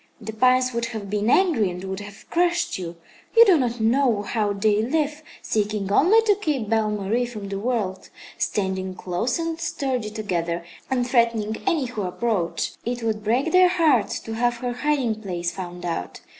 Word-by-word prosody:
The 220 -1 -7
pines 255 +2 +3
would 235 0 -1
have 220 -4 -6
been 210 +1 0
angry 280 - +3
and 180 +1 -7
would 190 0 -4
have 205 0 -11
crushed 345 - +1
you. 175 -2 -6 0.4
You 465 - +10
do 385 -5 +6
not 245 -5 0
know 230 -1 +2
how 210 -1 -1
they 205 +1 +2
live, 295 +5 -1 0.2
seeking 210 -2 -1
only 395 - +5
to 425 -2 +4
keep 270 - -1
Belle 220 -1 +2
Marie 210 +4 -1
from 210 -4 -7
the 195 0 -3
world, 210 -5 -2 0.3
standing 190 -2 -2
close 185 - -2
and 330 -1 -3
sturdy 265 -9 -2
together 175 -6 -3 0.2
and 250 -2 0
threatening 230 -3 +1
any 325 -8 +2
who 235 -4 -4
approach. 190 -1 -1
It 240 0 -3
would 215 -2 -1
break 245 +9 +1
their 365 0 +6
hearts 315 - +2
to 225 - -6
have 240 +1 +1
her 245 0 -3
hiding 250 -5 0
place 175 -4 -3
found 180 -1 -7
out. 165 - -4
225 Hz, 180 wpm, -23 LUFS, 200-255 Hz, 0.4 s, You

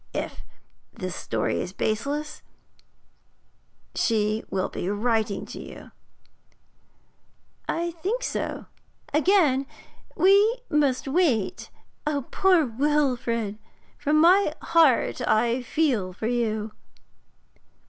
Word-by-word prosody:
If - - -4 0.5
this 185 -1 -6
story - - -2
is 180 - -6
baseless, 290 +10 -2 1.5
she 215 -1 0
will 190 -1 -1
be 180 - -4
writing 215 -1 0
to - - -9
you.' - - -11 1.8
'I 340 +1 -1
think 390 +10 -3
so. - - -3 0.5
Again 300 -5 +3 0.5
we 405 +5 +5
must 285 -3 +1
wait. 270 - 0 0.6
Poor 365 -5 +4
Wilfrid! 245 -5 0 0.4
from 300 +1 +2
my 365 +5 +5 0.2
heart 320 -7 +4
I 235 +3 +2
feel 245 -9 0
for 210 - -6
you!' 220 -2 -1
260 Hz, 90 wpm, -25 LUFS, 220-320 Hz, 1.8 s, we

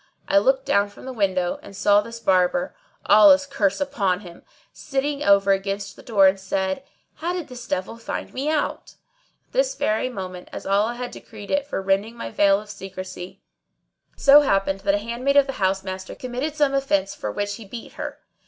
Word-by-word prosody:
I 295 - +5
looked - - +2
down 200 0 +2
from 205 - -14
the 260 - -6
window 185 -5 0
and 200 - -12
saw 205 +1 +4
this 230 +2 -9
Barber 195 +8 +1 0.3
(Allah's 285 -2 +7
curse 210 -9 0
upon 205 -10 0
him!) 175 -4 -12 0.3
sitting 280 +1 -2
over 200 -5 +4
against 195 +1 -2
the - - -13
door 205 -5 +3
and 190 +1 +4
said, 190 +4 -2 0.3
"How 345 +2 -2
did 355 -5 -5
this 245 -1 -9
devil 190 +5 -3
find 230 - -6
me 275 +3 -2
out?" 310 -1 -2 0.5
At - - -41
this - - +1
very 220 - 0
moment, 185 -6 -7
as - - -7
Allah 205 +4 +1
had 245 0 -5
decreed 210 -3 -10
it 285 -1 +1
for 195 - -3
rending 195 +4 0
my 115 - -6
veil 200 - +4
of 210 0 -10
secrecy, 185 -2 -8 0.7
it - - -25
so 285 +1 +8
happened 195 -7 +1
that 200 0 +1
a 205 +2 -4
handmaid 255 +4 0
of 280 - +7
the 270 - -4
house 190 0 +1
master 190 0 -6
committed 255 +5 -4
some 290 -3 +2
offence 200 -9 +1
for 105 - -5
which 205 - -3
he 230 - -10
beat 230 +4 -9
her. - - -7
205 Hz, 200 wpm, -23 LUFS, 195-275 Hz, 0.7 s, so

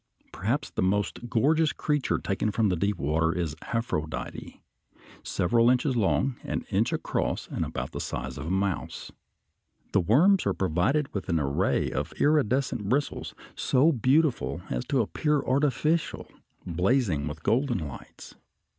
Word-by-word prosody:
Perhaps 125 +9 -2
the - - -2
most 105 +5 -1
gorgeous 150 +7 +3
creature 150 -3 0
taken 100 +2 -1
from 105 0 +1
deep 100 +3 0
water 80 +3 +1
is 85 -4 -2 0.2
Aphrodite, 115 -10 -3 0.6
several 115 +6 +2
inches 125 +1 +2
long, 120 +4 +1
an - - -3
inch - - +2
across, - - -2
and - - -2
about - - -4
the - - -5
size 65 +2 -5
of 75 - -5
a - - -2
mouse. 95 0 -2 0.8
The - - +3
worms 165 - +4
are - - +1
provided 95 - 0
with 100 - -4
an 85 -2 +2
array 70 -1 0
of 75 +2 -3
iridescent 135 -7 +1
bristles, 140 +4 -1 0.2
so 140 +5 +3
beautiful 135 +2 +1
as - - -2
to 135 -3 +1
appear 150 +6 0
artificial, 150 +4 0 0.4
blazing 90 - +1
with 75 +2 -7
golden 120 +3 +1
lights. 70 - -11
115 Hz, 140 wpm, -27 LUFS, 90-140 Hz, 0.8 s, worms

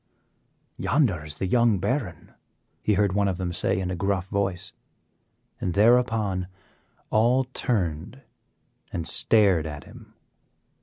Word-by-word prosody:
"Yonder 110 - +1
is 75 -1 -5
the 95 - -2
young 115 +1 +3
baron," 100 - -3 0.5
he 105 - +1
heard 100 -2 +2
one 100 0 +2
of 95 -3 -1
them 90 -2 -3
say 95 +2 +1
in 90 -1 -3
a - - -2
gruff 95 0 -1
voice, 100 -3 -2 0.9
and 90 - -3
thereupon 110 -4 +2 0.6
all 120 +4 +3
turned 105 - -3 0.7
and 85 -1 -4
stared 95 -8 +3
at 75 -2 -7
him. - - -15
100 Hz, 125 wpm, -25 LUFS, 90-115 Hz, 0.9 s, young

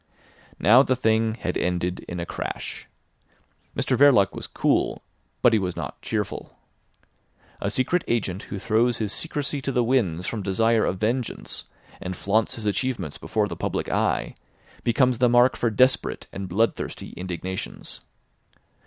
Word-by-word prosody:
Now 115 +9 +7
the 130 -2 +2
thing 110 -2 +2
had 90 -6 -3
ended 90 0 -1
in 90 - -4
a 85 - -2
crash. - - -5 0.9
Mr 130 - +1
Verloc 125 -8 +5
was - - -6
cool; - - 0 0.4
but 120 - +6
he 110 - +4
was 90 -2 -2
not - - -6
cheerful. - - -4 1.0
A 100 - 0
secret 130 - +1
agent 100 -5 -1
who 100 - -4
throws 115 +4 +2
his 105 -2 -2
secrecy 145 -3 -2
to 135 - -2
the 125 -2 +2
winds 100 -9 +1
from 110 - -3
desire 110 +4 +2
of 95 - -1
vengeance, 115 +5 -2 0.4
and 90 0 -4
flaunts 105 +4 +1
his 110 - -5
achievements 125 +5 -1
before 105 -2 0
the 85 - -5
public - - -2
eye, - - 0 0.5
becomes 125 +1 +2
the 125 -1 +5
mark 120 +2 +5
for 120 - +1
desperate 130 +5 +2
and 95 -1 -5
bloodthirsty 110 +6 -1
indignations. 95 +1 -5
110 Hz, 150 wpm, -25 LUFS, 95-125 Hz, 1.0 s, Now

